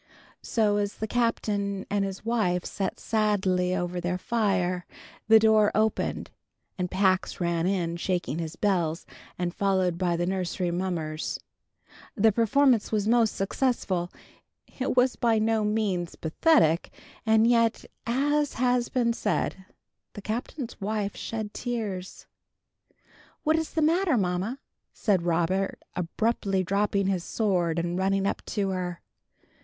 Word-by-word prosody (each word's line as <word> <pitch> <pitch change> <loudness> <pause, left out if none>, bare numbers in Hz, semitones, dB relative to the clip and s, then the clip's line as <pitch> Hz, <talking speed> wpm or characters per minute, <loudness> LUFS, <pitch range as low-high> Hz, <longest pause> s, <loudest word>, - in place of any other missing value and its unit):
So 210 -3 +1
as 205 0 -1
the 220 - -3
Captain 205 -4 -1
and 205 -1 0
his 195 +2 -5
wife 205 -7 0
sat 195 -1 -3
sadly 190 -4 +1
over 175 0 -2
their 180 +1 -1
fire, 185 -4 0 0.4
the 220 +1 +8
door 220 -1 +4
opened, 215 0 0 0.4
and 180 -1 -2
Pax 185 0 +1
ran 170 -1 0
in 175 -3 -1
shaking 175 -3 -2
his 165 -1 -4
bells, 170 -5 0 0.3
and 175 -1 -2
followed 185 -3 +1
by 175 -2 +1
the 175 - 0
nursery 180 -1 -1
mummers. 170 -4 -3 0.8
The 220 -1 +4
performance 235 +2 +3
was 210 -1 0
most 230 -2 +3
successful. 195 -4 -1 0.7
It 255 0 -1
was 250 +1 +4
by 230 -3 +2
no 220 0 +2
means 210 -5 -1
pathetic, 165 - +2 0.3
and 220 0 +4
yet, 230 -1 +2 0.2
as 290 +4 +1
has 245 0 +1
been 235 -2 +1
said, 195 -3 -2 0.5
the 205 - -8
Captain's 235 +2 -5
wife 205 0 -2
shed 220 -2 -5
tears. 210 -7 -4 1.2
"What 315 0 +3
is 320 -1 -2
the 320 - +1
matter, 330 -2 +3
mamma?" 190 +5 -1 0.4
said 200 -5 +1
Robert, 175 +3 0 0.2
abruptly 195 +2 0
dropping 200 +1 +1
his 190 -3 0
sword 180 -7 0
and 175 +2 -1
running 195 +1 +1
up - - -1
to 200 -2 -1
her. 180 -2 -3
200 Hz, 135 wpm, -27 LUFS, 180-225 Hz, 1.2 s, the